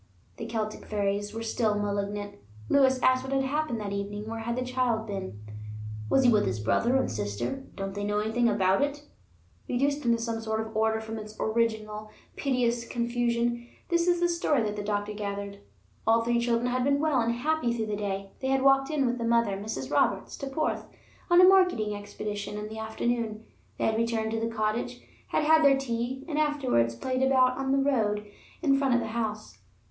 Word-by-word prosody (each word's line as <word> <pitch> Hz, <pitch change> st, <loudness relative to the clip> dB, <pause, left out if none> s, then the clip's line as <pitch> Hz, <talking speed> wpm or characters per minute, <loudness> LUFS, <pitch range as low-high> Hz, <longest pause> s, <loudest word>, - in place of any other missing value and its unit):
The 225 Hz, -, -5 dB
Celtic 215 Hz, -2 st, -4 dB
fairies 205 Hz, 0 st, -1 dB
are 225 Hz, -, -3 dB
still 220 Hz, -1 st, +1 dB
malignant. 205 Hz, 0 st, -3 dB, 0.3 s
Lewis 265 Hz, -2 st, +4 dB
asked 255 Hz, 0 st, +4 dB
what 265 Hz, -, -6 dB
had 270 Hz, 0 st, +2 dB
happened 290 Hz, -3 st, -1 dB
that 200 Hz, -1 st, -4 dB
evening; 205 Hz, +1 st, -4 dB
where 225 Hz, 0 st, -4 dB
had 235 Hz, +1 st, -2 dB
the 255 Hz, 0 st, -2 dB
child 250 Hz, -3 st, 0 dB
been? 195 Hz, -, -5 dB, 0.7 s
"Was 265 Hz, -, +4 dB
he 245 Hz, -, +6 dB
with 210 Hz, -2 st, +3 dB
his 115 Hz, -, -1 dB
brother 235 Hz, -, +2 dB
and 265 Hz, -, +1 dB
sister? 105 Hz, -, -3 dB
Don't 195 Hz, -1 st, -4 dB
they 205 Hz, +1 st, -4 dB
know 205 Hz, 0 st, 0 dB
anything 220 Hz, +3 st, +2 dB
about 195 Hz, -1 st, +2 dB
it?" 290 Hz, 0 st, -1 dB, 0.7 s
Reduced 280 Hz, +4 st, +1 dB
into 235 Hz, -1 st, +3 dB
some 230 Hz, -1 st, -3 dB
sort 220 Hz, 0 st, -2 dB
of 220 Hz, 0 st, -5 dB
order 220 Hz, 0 st, +2 dB
from 220 Hz, 0 st, -6 dB
its 215 Hz, 0 st, -9 dB
original 220 Hz, -1 st, -1 dB, 0.3 s
piteous 245 Hz, -4 st, 0 dB
confusion, 235 Hz, 0 st, -1 dB, 0.2 s
this 340 Hz, 0 st, +2 dB
is 350 Hz, -1 st, +3 dB
the 350 Hz, -, +3 dB
story 335 Hz, -7 st, +1 dB
that 210 Hz, -1 st, -2 dB
the 210 Hz, -, -3 dB
doctor 205 Hz, 0 st, -2 dB
gathered. 200 Hz, -1 st, -5 dB, 0.5 s
All 230 Hz, +1 st, +4 dB
three 235 Hz, 0 st, +2 dB
children 235 Hz, +1 st, +1 dB
had 255 Hz, 0 st, +1 dB
been 280 Hz, +1 st, +2 dB
well 295 Hz, -4 st, +2 dB
and 235 Hz, +1 st, 0 dB
happy 300 Hz, 0 st, 0 dB
through 230 Hz, -2 st, -1 dB
the 210 Hz, -1 st, -2 dB
day. 195 Hz, -1 st, -3 dB
They 265 Hz, -, -3 dB
had 265 Hz, 0 st, +2 dB
walked 270 Hz, 0 st, +4 dB
in 300 Hz, -3 st, +1 dB
with 245 Hz, 0 st, 0 dB
the -, -, -2 dB
mother, 230 Hz, -3 st, +2 dB
Mrs. 210 Hz, +3 st, -5 dB
Roberts, -, -, +1 dB
to 275 Hz, -, -5 dB
Porth 290 Hz, +3 st, -2 dB, 0.4 s
on 345 Hz, 0 st, +6 dB
a 365 Hz, -, +9 dB
marketing 360 Hz, -, +4 dB
expedition 205 Hz, 0 st, -5 dB
in 210 Hz, 0 st, -5 dB
the 220 Hz, 0 st, -7 dB
afternoon; 220 Hz, 0 st, -2 dB, 0.3 s
they -, -, 0 dB
had 220 Hz, 0 st, +1 dB
returned 225 Hz, -1 st, 0 dB
to 225 Hz, -, -1 dB
the 225 Hz, -, -1 dB
cottage, 230 Hz, +2 st, -2 dB, 0.3 s
had -, -, 0 dB
had 315 Hz, +1 st, +5 dB
their 275 Hz, -1 st, +6 dB
tea, 255 Hz, +1 st, -3 dB
and 305 Hz, -2 st, -1 dB
afterwards 260 Hz, -, +1 dB
played 255 Hz, -, -2 dB
about 260 Hz, -1 st, +4 dB
on 270 Hz, 0 st, -1 dB
the 275 Hz, -, +3 dB
road 220 Hz, -7 st, +1 dB, 0.4 s
in 275 Hz, -3 st, +4 dB
front 270 Hz, -3 st, +2 dB
of -, -, +3 dB
the 230 Hz, -, -3 dB
house. 215 Hz, -2 st, -4 dB
230 Hz, 205 wpm, -28 LUFS, 210-265 Hz, 0.7 s, a